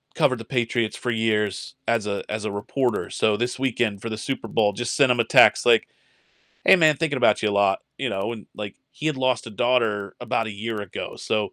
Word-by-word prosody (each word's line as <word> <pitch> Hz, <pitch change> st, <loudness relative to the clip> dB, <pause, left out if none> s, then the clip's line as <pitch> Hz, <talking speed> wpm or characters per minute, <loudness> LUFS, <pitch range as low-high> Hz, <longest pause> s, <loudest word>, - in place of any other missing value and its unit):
covered 130 Hz, -, +2 dB
the 115 Hz, -, -9 dB
Patriots 120 Hz, -3 st, -1 dB
for 125 Hz, -, -4 dB
years 110 Hz, -2 st, -1 dB
as 115 Hz, -2 st, +1 dB
a 100 Hz, -1 st, -3 dB
as 110 Hz, 0 st, -3 dB
a -, -, -2 dB
reporter. 115 Hz, +4 st, -2 dB
So 110 Hz, -1 st, +1 dB
this 120 Hz, +4 st, -2 dB
weekend 120 Hz, -6 st, -1 dB
for 115 Hz, -, -5 dB
the 110 Hz, -, -4 dB
Super 135 Hz, +5 st, -4 dB
Bowl 105 Hz, -3 st, +1 dB
just 120 Hz, +3 st, -3 dB
sent 140 Hz, -3 st, +4 dB
him 120 Hz, -, 0 dB
a 115 Hz, -, +5 dB
text 125 Hz, -2 st, +5 dB
like, 115 Hz, -2 st, +4 dB, 0.8 s
"Hey, -, -, +8 dB
man, 155 Hz, -4 st, +4 dB
thinking 145 Hz, -4 st, -1 dB
about 120 Hz, -, +3 dB
you 105 Hz, -, +2 dB
a -, -, -2 dB
lot," 100 Hz, -1 st, +2 dB, 0.2 s
you -, -, -1 dB
know, 95 Hz, +4 st, -2 dB
and 110 Hz, -3 st, -9 dB
like, 105 Hz, -2 st, -7 dB
he 150 Hz, -, -10 dB
had 155 Hz, -, 0 dB
lost 130 Hz, -2 st, 0 dB
a -, -, -7 dB
daughter 110 Hz, -3 st, 0 dB
about 115 Hz, -1 st, -1 dB
a -, -, -4 dB
year 110 Hz, +1 st, -4 dB
ago, 105 Hz, -, -7 dB
so, 105 Hz, -2 st, -2 dB
115 Hz, 230 wpm, -23 LUFS, 105-125 Hz, 0.8 s, Hey